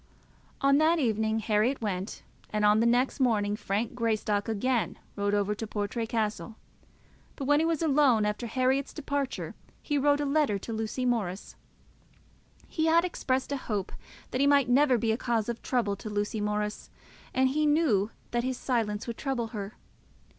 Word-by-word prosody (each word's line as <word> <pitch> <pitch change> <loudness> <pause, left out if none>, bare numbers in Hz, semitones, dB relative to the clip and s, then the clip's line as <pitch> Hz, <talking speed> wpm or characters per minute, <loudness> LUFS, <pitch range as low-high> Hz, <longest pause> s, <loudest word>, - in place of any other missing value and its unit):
On 275 0 +4
that 320 +2 +4
evening 220 -5 0
Herriot 220 +5 +1
went, 195 -3 -4 0.3
and 210 0 0
on 210 +1 +5
the 230 - +3
next 245 +4 +2
morning 210 -5 +2
Frank 210 +2 -2
Greystock 220 -3 0
again 235 +2 0 0.2
rode 205 0 0
over 205 0 +1
to 220 +1 -5
Portray 210 +2 -3
Castle; 220 0 -2 0.8
but 275 - -5
when 290 +2 +4
he 325 - +2
was 330 -1 0
alone 275 -8 +4
after 210 +3 -2
Herriot's 260 +3 0
departure, 285 -2 -3 0.3
he 290 -2 -1
wrote 290 +1 +3
a 295 - 0
letter 280 -7 +2
to 225 +4 -6
Lucy 220 +3 -2
Morris. 210 -6 -2 1.1
He 315 -1 -1
had 335 +2 +4
expressed 265 -7 -1
a 280 - 0
hope 210 -7 -3 0.4
that 255 - 0
he 280 - +4
might 280 -3 +4
never 260 0 +4
be 230 -1 0
a 220 - 0
cause 235 -4 -1
of 235 -1 -4
trouble 230 -6 0
to 215 - -7
Lucy 210 +1 -2
Morris, 210 0 -2 0.4
and 260 0 +2
he 300 +3 +1
knew 285 -10 +3 0.2
that 240 0 0
his 255 0 -2
silence 225 -5 -1
would 235 -2 -5
trouble 255 -5 -2
her. 210 -2 -6
235 Hz, 175 wpm, -28 LUFS, 210-275 Hz, 1.1 s, on